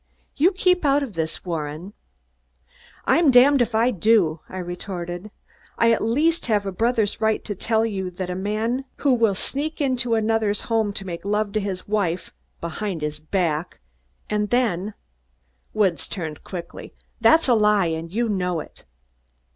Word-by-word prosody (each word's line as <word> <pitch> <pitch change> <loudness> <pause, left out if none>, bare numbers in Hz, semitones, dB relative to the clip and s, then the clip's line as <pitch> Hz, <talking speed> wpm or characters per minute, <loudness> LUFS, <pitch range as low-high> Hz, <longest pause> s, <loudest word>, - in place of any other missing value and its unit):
"You 335 +7 +4
keep 360 -2 +2
out 285 0 +3
of 250 -7 -6
this, 160 0 -4
Warren!" 165 +2 -4 1.1
"I'm 325 -3 +4
damned 265 +2 +6
if 240 -1 0
I 235 +3 +3
do," 195 -6 +3
I 185 - -7
retorted. 175 +1 -5 0.5
"I 230 0 +4
at 225 - +2
least 300 +9 +1
have 210 -3 +1
a 195 - -2
brother's 220 +1 0
right 220 0 +1
to 210 - -3
tell 220 +3 +1
you 190 -4 -3
that 180 +1 -5
a 180 - -3
man 215 +7 -2
who 280 -3 +2
will 225 -5 +3
sneak 290 +10 -3
into 250 -5 +1
another's 220 -1 +1
home 225 -3 0
to 195 - -5
make 170 -2 -6
love 210 +1 0
to 215 - 0
his 195 -3 -4
wife, 195 -5 -1 0.3
behind 170 0 -4
his 150 0 -3
back, 160 0 -2 0.5
and 210 -1 -1
then 215 -5 0 0.4
" 60 0 -43
Woods 190 -6 +1
turned 160 -5 -6
quickly. 175 -2 -8 0.2
"That's 320 -1 +5
a 250 - +5
lie, 210 -3 +4
and 165 0 -3
you 235 +4 0
know 180 -5 -1
it." - - -11
210 Hz, 165 wpm, -23 LUFS, 175-230 Hz, 1.1 s, damned